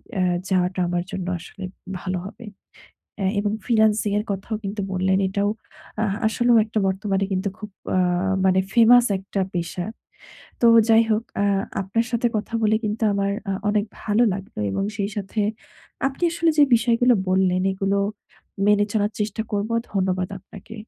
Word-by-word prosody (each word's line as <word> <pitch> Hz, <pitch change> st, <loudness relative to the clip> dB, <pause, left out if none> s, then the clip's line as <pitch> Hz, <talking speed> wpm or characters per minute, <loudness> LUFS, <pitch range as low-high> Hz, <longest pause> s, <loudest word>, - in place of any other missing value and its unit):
অ্যা 190 Hz, -, 0 dB, 0.3 s
যাওয়াটা 185 Hz, 0 st, +1 dB
আমার 175 Hz, 0 st, -1 dB
জন্য 190 Hz, -2 st, -4 dB
আসলে 190 Hz, -, -11 dB, 0.4 s
ভালো 185 Hz, 0 st, -3 dB
হবে। 230 Hz, +4 st, -11 dB, 0.7 s
অ্যা 190 Hz, -1 st, +1 dB
এবং 205 Hz, 0 st, 0 dB
ফ্রিল্যান্সিং 220 Hz, -3 st, +2 dB
এর 210 Hz, -, -4 dB
কথাও 200 Hz, +3 st, -3 dB
কিন্তু 200 Hz, +1 st, -3 dB
বললেন 190 Hz, 0 st, +1 dB
এটাও 200 Hz, +2 st, 0 dB, 0.5 s
আ -, -, +2 dB, 0.2 s
আসলেও 240 Hz, +1 st, +3 dB
একটা 220 Hz, 0 st, -2 dB
বর্তমানে 195 Hz, 0 st, 0 dB
কিন্তু 190 Hz, +1 st, 0 dB
খুব 210 Hz, -, -8 dB, 0.3 s
আ -, -, +3 dB, 0.5 s
মানে 190 Hz, 0 st, +4 dB
ফেমাস 240 Hz, +1 st, +7 dB
একটা 195 Hz, +1 st, -3 dB
পেশা। 175 Hz, 0 st, -3 dB, 0.8 s
তো 235 Hz, -, +5 dB, 0.2 s
যাই 225 Hz, 0 st, +6 dB
হোক 215 Hz, +1 st, +2 dB, 0.2 s
আ -, -, +2 dB, 0.4 s
আপনার 195 Hz, +5 st, 0 dB
সাথে 240 Hz, 0 st, +1 dB
কথা 220 Hz, +2 st, -4 dB
বলে 215 Hz, 0 st, +3 dB
কিন্তু 215 Hz, +2 st, -3 dB
আমার 200 Hz, 0 st, 0 dB, 0.2 s
আ -, -, +1 dB, 0.2 s
অনেক 205 Hz, 0 st, +2 dB, 0.2 s
ভালো 215 Hz, +2 st, +1 dB
লাগবে। 190 Hz, -, -6 dB
এবং 195 Hz, -, -1 dB
সেই 200 Hz, 0 st, -2 dB
সাথে 205 Hz, +2 st, -3 dB, 0.7 s
আপনি 270 Hz, +5 st, -5 dB
আসলে 335 Hz, 0 st, +2 dB
যে 295 Hz, -, +8 dB
বিষয়গুলো 240 Hz, +1 st, +3 dB
বললেন 185 Hz, -1 st, +2 dB
এগুলো 195 Hz, +1 st, 0 dB, 0.7 s
মেনে 205 Hz, 0 st, +4 dB
চলার 210 Hz, -1 st, +1 dB
চেষ্টা 215 Hz, +1 st, -1 dB
করবো, 210 Hz, +2 st, -1 dB, 0.2 s
ধন্যবাদ 185 Hz, -2 st, 0 dB
আপনাকে। 200 Hz, +4 st, -13 dB
205 Hz, 160 wpm, -23 LUFS, 190-220 Hz, 0.8 s, যে